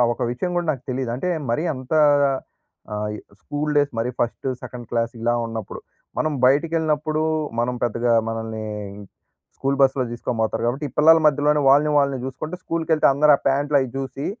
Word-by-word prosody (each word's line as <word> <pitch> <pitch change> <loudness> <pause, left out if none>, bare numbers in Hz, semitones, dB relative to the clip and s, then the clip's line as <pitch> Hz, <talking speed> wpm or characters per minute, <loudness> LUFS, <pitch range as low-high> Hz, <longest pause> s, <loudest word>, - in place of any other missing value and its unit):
ఒక - - -9
విషయం 150 +9 -3
కూడా 175 -1 0
నాకు 130 -4 -8
తెలీదు. 130 -1 -2
అంటే 180 +8 -2 0.2
మరీ 135 +8 0
అంత 130 +1 -9 1.0
ఆహ్, 105 0 -2 0.3
స్కూల్ 150 +5 -3
డేస్ 145 0 +2
మరి 115 +2 0
ఫస్ట్, 120 +3 -2 0.2
సెకండ్ 120 -1 -8
క్లాస్ 115 0 0
ఇలా 120 +1 +1
ఉన్నప్పుడు. 115 -3 -6 0.4
మనం 155 - 0
బయటికి 145 +5 +2
వెళ్ళినప్పుడు, 155 -1 0 0.4
మనం 120 +1 0
పెద్దగా 120 +1 0 0.2
మనల్ని 110 -1 -4 0.9
స్కూల్ 135 +1 -1
బస్సులో 135 -1 +3
తీసుకొని 120 -1 -3
పోతారు 110 +1 -1
కాబట్టి, 135 +5 -1
ఈ - - -16
పిల్లల 160 +2 +7
మధ్యలోనే 150 0 +3
వాళ్ళని 145 +2 +5
వాళ్ళని 140 -3 0
చూసుకుంటే 145 +6 -5
స్కూల్‌కి 165 -1 -3
వెళ్తే 155 -1 +4
అందరూ 150 +2 +5
ఆ - - -15
ప్యాంట్లు 145 +2 +2
అవి 130 -2 -3
చూసి, 135 +1 -5
135 Hz, 170 wpm, -22 LUFS, 120-150 Hz, 1.0 s, పిల్లల